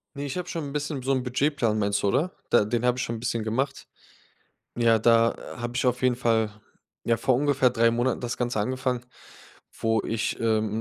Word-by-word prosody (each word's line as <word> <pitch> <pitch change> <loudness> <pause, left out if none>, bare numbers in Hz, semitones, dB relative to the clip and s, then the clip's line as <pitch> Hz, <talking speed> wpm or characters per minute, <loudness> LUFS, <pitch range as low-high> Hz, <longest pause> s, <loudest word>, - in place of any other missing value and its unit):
Ne, 140 +1 -4
ich 140 - -4
habe 180 0 -4
schon 165 -3 -4
'n 140 - -7
bisschen 145 -2 -3
so 135 - 0
'n 130 -1 +2
Budgetplan, 125 -3 0
meinst 100 -1 0
du, 100 - +1
oder? 150 - +1 0.2
Da 105 - +4
den 120 +2 -1
habe 125 0 +2
ich 130 - -1
schon 115 0 -3
'n - - -8
bisschen 115 -1 -2
gemacht. 130 +5 -2 0.9
Ja, 115 -1 +4
da 115 +1 +4 0.2
habe 120 +1 -4
ich 130 - 0
auf 125 0 +1
jeden 125 -1 +3
Fall 110 -3 +1 0.5
ja, 115 -1 +2
vor 125 +2 +2
ungefähr 140 -2 +3
3 115 -1 +3
Monaten 120 +2 0
das 120 0 -3
Ganze 120 -3 -1
angefangen, 125 +2 -1 0.8
wo 115 -1 +1
ich, 115 0 -2
ähm, 110 -1 +1
120 Hz, 210 wpm, -26 LUFS, 115-130 Hz, 0.9 s, Da